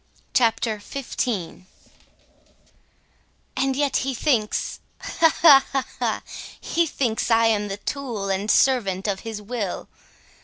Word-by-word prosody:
CHAPTER 225 Hz, -3 st, +2 dB
XV 215 Hz, -7 st, -4 dB, 1.9 s
And 270 Hz, -1 st, 0 dB
yet 280 Hz, -1 st, +1 dB
he 265 Hz, 0 st, -2 dB
thinks,—ha, 260 Hz, +5 st, 0 dB
ha, 280 Hz, -5 st, +9 dB
ha, 270 Hz, -1 st, +1 dB, 0.2 s
ha,—he 340 Hz, 0 st, -2 dB
thinks 240 Hz, -6 st, -1 dB
I 230 Hz, 0 st, +4 dB
am 210 Hz, -2 st, +2 dB
the 195 Hz, 0 st, -4 dB
tool 235 Hz, -3 st, -4 dB
and 195 Hz, +2 st, -2 dB
servant 215 Hz, -9 st, +2 dB
of 195 Hz, -2 st, -1 dB
his 220 Hz, -2 st, -7 dB
will. 210 Hz, -4 st, -4 dB
230 Hz, 110 wpm, -23 LUFS, 205-270 Hz, 1.9 s, ha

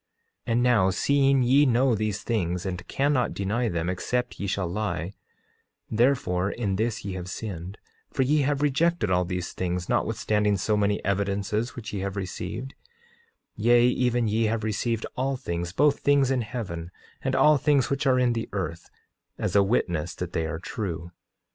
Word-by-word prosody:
8:24 -, -, -1 dB
And 120 Hz, +1 st, +2 dB
now, 115 Hz, -7 st, +4 dB
seeing 135 Hz, +6 st, +3 dB
ye 135 Hz, +4 st, +5 dB
know 125 Hz, +1 st, +3 dB
these 105 Hz, -1 st, -2 dB
things 90 Hz, -6 st, -1 dB
and 90 Hz, -2 st, -4 dB
cannot 140 Hz, -2 st, +1 dB
deny 110 Hz, +5 st, 0 dB
them 85 Hz, -1 st, -2 dB
except 125 Hz, +7 st, -2 dB
ye 100 Hz, -, -2 dB
shall 95 Hz, -1 st, -1 dB
lie, 95 Hz, -1 st, -3 dB, 0.8 s
therefore 110 Hz, -6 st, +2 dB
in 105 Hz, -3 st, -2 dB
this 110 Hz, 0 st, -2 dB
ye 100 Hz, -, -3 dB
have 90 Hz, -1 st, -6 dB
sinned, 95 Hz, -1 st, -6 dB, 0.3 s
for 135 Hz, -, +1 dB
ye 145 Hz, +4 st, +2 dB
have 145 Hz, +1 st, 0 dB
rejected 160 Hz, -, +2 dB
all 90 Hz, 0 st, +2 dB
these 90 Hz, -1 st, -4 dB
things, 90 Hz, -1 st, -2 dB
notwithstanding 105 Hz, -1 st, +1 dB
so 105 Hz, +3 st, +1 dB
many 105 Hz, 0 st, 0 dB
evidences 100 Hz, +3 st, -1 dB
which 110 Hz, -4 st, -7 dB
ye 100 Hz, -, -2 dB
have 100 Hz, +1 st, -3 dB
received; 100 Hz, +6 st, -5 dB, 0.8 s
yea, 120 Hz, +2 st, +4 dB
even 125 Hz, -1 st, +2 dB
ye 110 Hz, +2 st, +1 dB
have 110 Hz, 0 st, -1 dB
received 110 Hz, +1 st, -1 dB
all 135 Hz, +1 st, -1 dB
things, 85 Hz, -8 st, -4 dB
both 145 Hz, +7 st, +3 dB
things 140 Hz, -2 st, +3 dB
in 130 Hz, -2 st, +1 dB
heaven, 100 Hz, -8 st, -5 dB, 0.3 s
and 130 Hz, 0 st, -1 dB
all 150 Hz, 0 st, +5 dB
things 140 Hz, -2 st, +2 dB
which 140 Hz, 0 st, 0 dB
are 130 Hz, -1 st, +4 dB
in 125 Hz, -1 st, +3 dB
the 115 Hz, -1 st, -3 dB
earth, 85 Hz, -4 st, -4 dB, 0.5 s
as -, -, -2 dB
a 100 Hz, -, +7 dB
witness 90 Hz, -6 st, 0 dB
that 90 Hz, -1 st, -5 dB
they 80 Hz, -1 st, 0 dB
are 80 Hz, -, -3 dB
true. 85 Hz, -2 st, -5 dB
105 Hz, 175 wpm, -26 LUFS, 95-125 Hz, 0.8 s, a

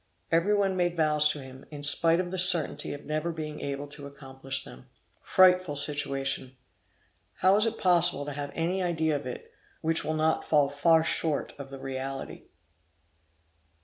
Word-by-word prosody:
Every 170 Hz, +6 st, +2 dB
one 195 Hz, -2 st, +1 dB
made 175 Hz, -1 st, -1 dB
vows 150 Hz, -1 st, +3 dB
to 150 Hz, -, -3 dB
him, 130 Hz, 0 st, -12 dB
in 145 Hz, -1 st, -9 dB
spite 165 Hz, +3 st, +3 dB
of 180 Hz, -1 st, -3 dB
the 185 Hz, -, -2 dB
certainty 175 Hz, -4 st, +4 dB
of 145 Hz, -, -8 dB
never 155 Hz, +3 st, -2 dB
being 155 Hz, -2 st, -6 dB
able 140 Hz, 0 st, -4 dB
to 145 Hz, -1 st, -9 dB
accomplish 135 Hz, -1 st, -6 dB
them. 65 Hz, -, -13 dB, 0.3 s
Frightful 185 Hz, -4 st, +3 dB
situation! 135 Hz, -2 st, -1 dB, 0.8 s
How 190 Hz, +1 st, +3 dB
is 215 Hz, +2 st, +2 dB
it 225 Hz, 0 st, -3 dB
possible 175 Hz, -6 st, +3 dB
to 145 Hz, -, -5 dB
have 145 Hz, 0 st, -5 dB
any 175 Hz, +3 st, -1 dB
idea 160 Hz, -3 st, 0 dB
of 140 Hz, -2 st, -5 dB
it, 125 Hz, -, -8 dB, 0.3 s
which 160 Hz, 0 st, +1 dB
will 155 Hz, -, -2 dB
not 160 Hz, +1 st, +1 dB
fall 145 Hz, -3 st, +2 dB
far 160 Hz, +3 st, +3 dB
short 160 Hz, -2 st, -1 dB
of 140 Hz, -1 st, -8 dB
the 135 Hz, -, -9 dB
reality! 135 Hz, 0 st, -6 dB
150 Hz, 170 wpm, -27 LUFS, 140-170 Hz, 0.8 s, certainty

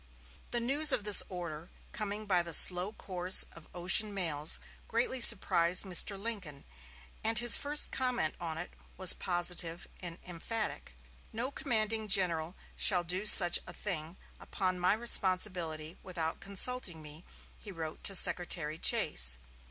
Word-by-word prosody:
The 240 Hz, -, -5 dB
news 285 Hz, +6 st, +2 dB
of 225 Hz, -, -4 dB
this 210 Hz, -1 st, +6 dB
order, 170 Hz, -3 st, -12 dB, 0.2 s
coming 210 Hz, 0 st, -10 dB
by 185 Hz, -4 st, -2 dB
the 170 Hz, -2 st, +1 dB
slow 180 Hz, +2 st, +4 dB
course 185 Hz, -3 st, +3 dB
of 165 Hz, -2 st, -20 dB
ocean 190 Hz, +4 st, 0 dB
mails, 160 Hz, -5 st, -1 dB, 0.3 s
greatly 245 Hz, +2 st, -5 dB
surprised 180 Hz, -6 st, +2 dB
Mr. 195 Hz, +1 st, 0 dB
Lincoln, 195 Hz, -10 st, -10 dB, 0.6 s
and 225 Hz, +1 st, -3 dB
his 240 Hz, +1 st, +5 dB
first 290 Hz, +1 st, -1 dB
comment 250 Hz, -11 st, -5 dB
upon 165 Hz, -2 st, -9 dB
it 175 Hz, -, -10 dB, 0.3 s
was 185 Hz, -1 st, +5 dB
positive 175 Hz, -1 st, -4 dB
and 175 Hz, -2 st, -12 dB
emphatic. 180 Hz, -, -8 dB, 0.4 s
"No 240 Hz, +5 st, -7 dB
commanding 220 Hz, -6 st, -5 dB
general 180 Hz, -4 st, -2 dB, 0.2 s
shall 180 Hz, -4 st, -1 dB
do 185 Hz, +5 st, -5 dB
such 175 Hz, -4 st, +9 dB
a -, -, -11 dB
thing, 170 Hz, -3 st, -10 dB, 0.2 s
upon 185 Hz, -1 st, -8 dB
my 180 Hz, +2 st, -2 dB
responsibility, 185 Hz, -7 st, -2 dB
without 170 Hz, -4 st, -9 dB
consulting 200 Hz, -4 st, 0 dB
me," 150 Hz, +3 st, -11 dB, 0.4 s
he 205 Hz, -, -15 dB
wrote 160 Hz, -3 st, -12 dB
to 195 Hz, -, -1 dB
Secretary 165 Hz, -4 st, +1 dB
Chase. 60 Hz, 0 st, +2 dB
185 Hz, 140 wpm, -27 LUFS, 170-215 Hz, 0.6 s, such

